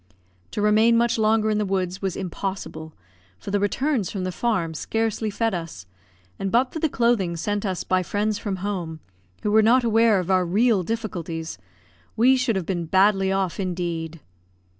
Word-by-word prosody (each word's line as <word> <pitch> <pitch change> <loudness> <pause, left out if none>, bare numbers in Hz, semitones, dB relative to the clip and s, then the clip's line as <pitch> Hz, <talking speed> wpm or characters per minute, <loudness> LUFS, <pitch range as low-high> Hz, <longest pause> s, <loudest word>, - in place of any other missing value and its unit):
To 210 - -3
remain 220 +2 +4
much 235 -1 +2
longer 215 0 +2
in 210 - +1
the - - +1
woods 190 -2 -2
was 190 -3 -2
impossible, 180 -4 -5 0.4
for 150 - -7
the 205 - +1
returns 225 - 0
from 195 -3 -4
the 185 - -2
farm 180 -6 -1
scarcely 225 +5 -1
fed 225 +1 -1
us; 165 - -6 0.5
and 195 - -2
but 250 +2 +2
for 320 - -3
the 315 - +1
clothing 230 -10 +1
sent 205 +4 -2
us 185 -2 -2
by 185 0 +1
friends 210 +3 -1
from 200 -4 -3
home, 175 -6 -3 0.4
who 210 - 0
were 220 +1 +6
not 240 +4 +4
aware 225 -2 +4
of 180 +1 -2
our 185 -1 +4
real 205 +4 +2
difficulties, 170 - -4 0.6
we 250 +4 +5
should 255 -4 0
have 190 -3 -2
been 175 -3 -3
badly 195 +2 +3
off 195 -2 -1
indeed. 170 -3 -3
200 Hz, 180 wpm, -24 LUFS, 180-225 Hz, 0.6 s, were